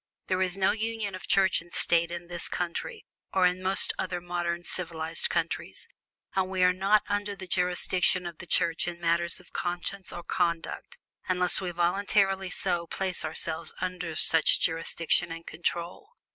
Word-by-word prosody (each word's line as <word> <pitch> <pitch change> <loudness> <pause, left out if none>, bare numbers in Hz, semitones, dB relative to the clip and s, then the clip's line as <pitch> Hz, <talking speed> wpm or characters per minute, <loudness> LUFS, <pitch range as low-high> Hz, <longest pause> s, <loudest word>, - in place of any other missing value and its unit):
There 185 0 0
is 185 0 +1
no 190 -1 +3
union 225 -2 -2
of 185 - -8
Church 190 -3 +3
and 170 +1 -17
State 170 0 +2
in 175 0 -6
this 175 -1 -1
country, 180 - -4 0.3
or 190 -1 +4
in 180 +1 +1
most 190 +1 +4
other 180 -1 -2
modern 175 0 -3
civilized 165 -2 -1
countries; 170 -1 -2 0.5
and 190 -1 +1
we 190 -1 +1
are 180 0 +5
not 195 +3 +3
under 205 0 -2
the 190 - -8
jurisdiction 180 0 +2
of 170 -2 -7
the 180 - -9
Church 170 0 +1
in 170 -1 -5
matters 170 0 +1
of - - -18
conscience 180 +2 -3
or 175 - -7
conduct, 170 - -2 0.3
unless 180 0 +2
we 185 - -2
voluntarily 190 +2 +1
so 175 -2 -1
place 185 0 -1
ourselves 160 +1 0
under 180 -3 -3
such 160 0 +4
jurisdiction 165 +1 +1
and 165 0 -7
control. 175 - -4
180 Hz, 165 wpm, -28 LUFS, 170-190 Hz, 0.5 s, are